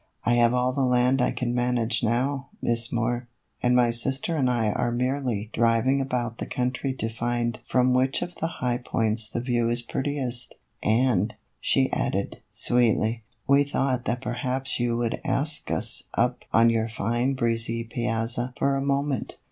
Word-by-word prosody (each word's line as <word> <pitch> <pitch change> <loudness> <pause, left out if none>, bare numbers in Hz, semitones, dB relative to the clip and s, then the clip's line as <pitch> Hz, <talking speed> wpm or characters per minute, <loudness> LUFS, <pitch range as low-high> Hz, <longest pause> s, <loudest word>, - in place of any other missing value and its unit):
" - - -30
I 120 - +3
have 120 -1 +4
all 125 +1 +1
the 140 - -1
land 125 0 +3
I - - +3
can 120 -1 -2
manage 120 -1 +1
now, 130 +4 0
Miss 115 0 0
Moore, 120 +1 -1 0.3
and 125 0 +3
my 120 -1 +4
sister 135 +7 +1
and 135 -5 +2
I 115 -4 +1
are 120 +3 -1
merely 125 -3 -1
driving 115 +4 +2
about 120 -3 -2
the - - -4
country 125 +2 -1
to 115 - -2
find 120 0 -2
from 125 0 +3
which 130 +4 +2
of 175 0 -7
the 165 - -1
high 125 -7 -2
points 110 -2 0
the 120 - -3
view 120 -2 0
is 120 0 -1
prettiest, 130 -3 -2 0.3
and," 110 -2 +2 0.2
she - - +2
added, - - -2
sweetly, 115 -1 +2
" 110 +2 -43
we 140 0 +5
thought 135 -3 -1
that 120 +2 -1
perhaps 130 +1 -2
you 120 -1 0
would 120 -1 -2
ask 150 +2 0
us - - -1
up - - 0
on 115 +1 +5
your 115 0 0
fine 120 +4 -1
breezy 115 -1 +1
piazza 120 +1 -1
for 140 0 +1
a 135 - -1
moment." 140 -2 -1
120 Hz, 175 wpm, -25 LUFS, 115-130 Hz, 0.3 s, we